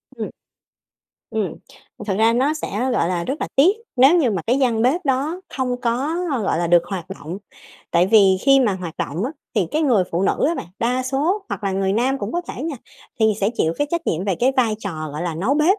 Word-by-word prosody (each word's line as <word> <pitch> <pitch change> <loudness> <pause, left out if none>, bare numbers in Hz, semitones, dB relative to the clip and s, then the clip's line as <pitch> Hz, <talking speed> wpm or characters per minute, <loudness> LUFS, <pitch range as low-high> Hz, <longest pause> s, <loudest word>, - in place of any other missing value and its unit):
Ừm. - - -4 1.0
Ừm, 215 -7 -2 0.5
thật 195 - 0
ra 225 +1 +4
nó 265 +5 +2
sẽ, 310 - -5 0.2
gọi 170 - +1
là, 175 -2 -1
rất 270 - -4
là - - -1
tiếc 345 +9 +5 0.2
nếu 270 +7 +6
như 265 -9 +2
mà 190 -4 -2
cái 250 +4 +2
gian 235 -4 +2
bếp 270 +9 +2
đó 285 +7 0 0.2
không 250 -1 -1
có, 255 +7 0 0.3
gọi 195 - 0
là, 175 - 0
được 170 0 +5
hoạt 185 -5 -5
động, 165 +5 -7 0.5
tại 170 +2 +3
vì 195 -2 +5
khi 275 -1 +5
mà 230 -6 +2
hoạt 180 -3 -6
động 165 +8 -2
á 255 - -2 0.2
thì 205 -6 +2
cái 310 - 0
người 235 -11 +3
phụ 170 +3 0
nữ 195 - +1
á 335 - 0
bạn, 170 - -5
đa 250 +2 0
số 300 +10 0
hoặc - - -5
là 195 - 0
người 190 0 0
nam 255 +6 +1
cũng 205 -2 -4
có 345 - 0
thể 250 - -6
nha, 310 -2 -3 0.4
thì 220 0 +4
sẽ 200 +2 +2
chịu 160 -7 +1
cái 290 - +1
trách 340 -2 -2
nhiệm 170 +3 -1
về 195 -2 +1
cái 250 +9 +2
vai 235 -4 +3
trò, 155 -7 -5
gọi 150 +3 -4
là, 175 -2 -2
nấu 200 - 0
bếp. 325 +8 +3
230 Hz, 240 wpm, -21 LUFS, 190-275 Hz, 1.0 s, nếu